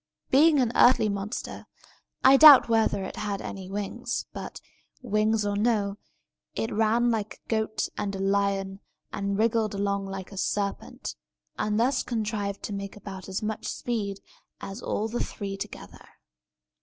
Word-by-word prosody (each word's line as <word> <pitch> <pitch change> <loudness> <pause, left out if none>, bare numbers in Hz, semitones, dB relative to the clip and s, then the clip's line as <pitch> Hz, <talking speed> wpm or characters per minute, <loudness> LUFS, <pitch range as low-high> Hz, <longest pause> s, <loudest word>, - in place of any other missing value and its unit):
Being 295 +2 +6
an 245 -3 +2
earthly 245 -4 +5
monster, 200 +3 -5 0.6
I 265 +1 +8
doubt 290 -2 +10
whether 225 -3 +2
it 190 - -7
had 205 -2 -3
any 190 -1 -7
wings; 200 0 -3
but, - - -7 0.4
wings 215 -1 +1
or 205 0 -1
no, 205 -2 +1 0.6
it 225 - -2
ran 225 +3 +2
like 215 -2 -2
a - - -32
goat 220 -1 0
and 200 -1 -2
a - - -5
lion, 195 0 0 0.3
and 200 0 -2
wriggled 220 -1 +1
along 200 0 -1
like 195 0 -7
a 195 - -10
serpent, 200 +1 -3 0.5
and 210 0 0
thus 255 +3 +2
contrived 210 -3 -3
to 205 - -4
make 200 0 -5
about 195 -2 -9
as 190 +3 -3
much 215 0 -3
speed 205 -5 -3 0.4
as 195 +4 -7
all 215 - -2
the 235 +2 -2
three 200 -2 -5
together. 195 - -9
210 Hz, 155 wpm, -27 LUFS, 200-225 Hz, 0.6 s, doubt